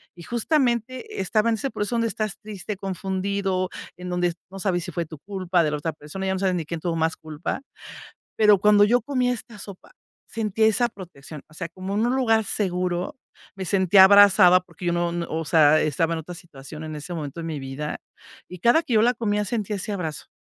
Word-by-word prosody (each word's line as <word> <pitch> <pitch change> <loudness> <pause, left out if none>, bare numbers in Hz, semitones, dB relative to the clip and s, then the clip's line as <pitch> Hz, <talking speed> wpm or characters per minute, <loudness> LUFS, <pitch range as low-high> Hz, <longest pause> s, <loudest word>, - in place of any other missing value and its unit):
y 170 - -12
justamente, 240 - -1
estaba 215 +4 +1
en 225 - +2
ese 270 +6 -3
proceso 210 +3 -2
donde 230 0 +1
estás 215 -2 -3
triste, 210 -1 -6
confundido. 190 0 -2 0.3
En 180 0 -7
donde 180 -1 0 0.2
no 195 - -10
sabes 180 -3 0
si - - -6
fue 170 -2 -3
tu 155 -1 -10
culpa, 185 -1 0
de 150 - 0
la 150 - -1
otra 160 +2 -3
persona, 155 +6 -7
ya 190 - 0
no 190 - -2
sabes 185 -2 +1
ni 165 - -3
quién 165 +2 -5
tuvo 170 0 -2
más 160 0 0
culpa. 155 - -5 0.8
Pero 210 -2 +5
cuando 205 +1 +5
yo 240 +4 +3
comía 250 -1 0
esta 235 -2 -8
sopa, 195 -1 -11 0.4
sentía 220 -1 0
esa 220 +3 +2
protección. 165 -8 -11
O 155 - -19
sea, 170 0 -5
como 185 +3 -6
en 220 +3 +1
un 245 - +1
lugar 225 -4 +2
seguro. 180 +5 -2 0.4
Me 195 - -5
sentía 190 +1 +6
abrazada, 195 -2 +7
porque 175 0 -10
yo 175 - +2
no 175 0 0
no 170 -1 -3
O 160 +1 -2
sea, 155 0 +5
estaba 165 +2 0
en 165 - -3
otra 175 +3 -9
situación, 155 -3 -11
en 155 -1 -6
ese 150 +4 -7
momento 155 0 -5
de - - -6
mi 155 -3 -4
vida, 135 +3 -5 0.5
Y 180 - -9
cada 240 - +4
que 270 -7 -2
yo 215 - +5
la 245 +2 +3
comía, 210 -2 -1
sentía 210 -1 -2
ese 200 +2 -4
abrazo, 160 -6 -4
190 Hz, 220 wpm, -24 LUFS, 170-215 Hz, 0.8 s, abrazada